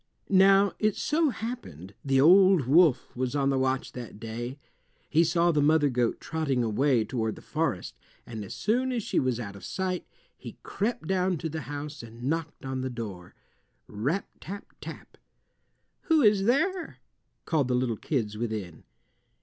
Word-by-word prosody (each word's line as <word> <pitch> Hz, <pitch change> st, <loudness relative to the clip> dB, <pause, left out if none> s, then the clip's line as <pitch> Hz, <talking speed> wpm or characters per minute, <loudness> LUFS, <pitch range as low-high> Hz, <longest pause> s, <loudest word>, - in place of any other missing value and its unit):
Now 195 Hz, 0 st, +5 dB
it 215 Hz, -2 st, +2 dB
so 310 Hz, +1 st, +1 dB
happened 100 Hz, -, -6 dB
the 135 Hz, -1 st, +2 dB
old 185 Hz, +1 st, +6 dB
wolf 155 Hz, +1 st, +4 dB
was 130 Hz, +2 st, -2 dB
on 140 Hz, -1 st, +2 dB
the 135 Hz, -, +1 dB
watch 130 Hz, 0 st, 0 dB
that 120 Hz, -4 st, -9 dB
day. 120 Hz, +4 st, -5 dB, 0.5 s
He 165 Hz, -, +5 dB
saw 170 Hz, +1 st, +3 dB
the 150 Hz, -2 st, +2 dB
mother 145 Hz, 0 st, +4 dB
goat 120 Hz, -2 st, 0 dB
trotting 140 Hz, -6 st, -1 dB
away 120 Hz, +1 st, +2 dB
toward 110 Hz, -4 st, -2 dB
the -, -, -12 dB
forest, -, -, -2 dB, 0.3 s
and 110 Hz, -3 st, -6 dB
as 100 Hz, -, -8 dB
soon 250 Hz, +5 st, 0 dB
as 240 Hz, -4 st, -2 dB
she -, -, 0 dB
was 130 Hz, -3 st, 0 dB
out 100 Hz, -4 st, -6 dB
of 100 Hz, -, -12 dB
sight, 185 Hz, -1 st, -3 dB, 0.3 s
he -, -, -10 dB
crept 210 Hz, -5 st, -2 dB
down 185 Hz, 0 st, +1 dB
to 160 Hz, +2 st, -4 dB
the 160 Hz, +1 st, -4 dB
house 145 Hz, +1 st, -6 dB
and 115 Hz, +1 st, -11 dB
knocked 160 Hz, +1 st, -3 dB
at 130 Hz, -1 st, -3 dB
the 130 Hz, -, -2 dB
door—rap 115 Hz, -, -6 dB
tap 200 Hz, +4 st, -9 dB
tap! -, -, -10 dB, 0.9 s
"Who 320 Hz, -4 st, +4 dB
is 205 Hz, -3 st, +4 dB
there?" 330 Hz, -, +1 dB, 0.5 s
called 150 Hz, -6 st, +1 dB
the 125 Hz, -, +1 dB
little 125 Hz, -2 st, 0 dB
kids 110 Hz, -4 st, -2 dB
within. 105 Hz, -8 st, -4 dB
145 Hz, 165 wpm, -28 LUFS, 120-190 Hz, 0.9 s, old